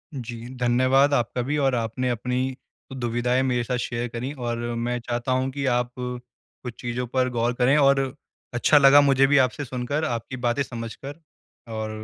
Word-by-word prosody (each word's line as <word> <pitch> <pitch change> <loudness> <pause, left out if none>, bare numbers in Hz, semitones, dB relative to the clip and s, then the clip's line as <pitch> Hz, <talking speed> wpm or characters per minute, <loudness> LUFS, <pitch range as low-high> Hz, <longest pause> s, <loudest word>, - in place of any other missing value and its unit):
जी। 120 -2 -7
धन्यवाद, 130 +4 +3
आपका 125 -1 0
भी 145 +5 -1
और 135 -3 +2
आपने 120 +2 -2
अपनी 125 +2 -2 0.4
दुविधाएँ 125 0 0
मेरे 125 -2 0
साथ 125 +2 -2
शेयर 120 0 -3
करीं 125 +4 -4
और 120 -2 -3 0.2
मैं 120 +1 -2
चाहता 120 +2 -3
हूँ 130 +1 +1
कि 140 +1 -3
आप 125 0 -1
कुछ 125 0 -8
चीज़ों 120 +1 -3
पर 130 +1 0
गौर 120 0 0
करें 130 +4 +4
और 140 -1 +5 0.5
अच्छा 120 +5 +4
लगा 140 0 +8
मुझे 135 -1 +4
भी 145 +1 +4
आपसे 130 +3 +1
सुनकर 130 +5 -2
आपकी 120 0 -4
बातें 120 +3 0
समझकर 130 +5 -8 0.5
और 110 0 -3
125 Hz, 170 wpm, -24 LUFS, 120-135 Hz, 0.5 s, लगा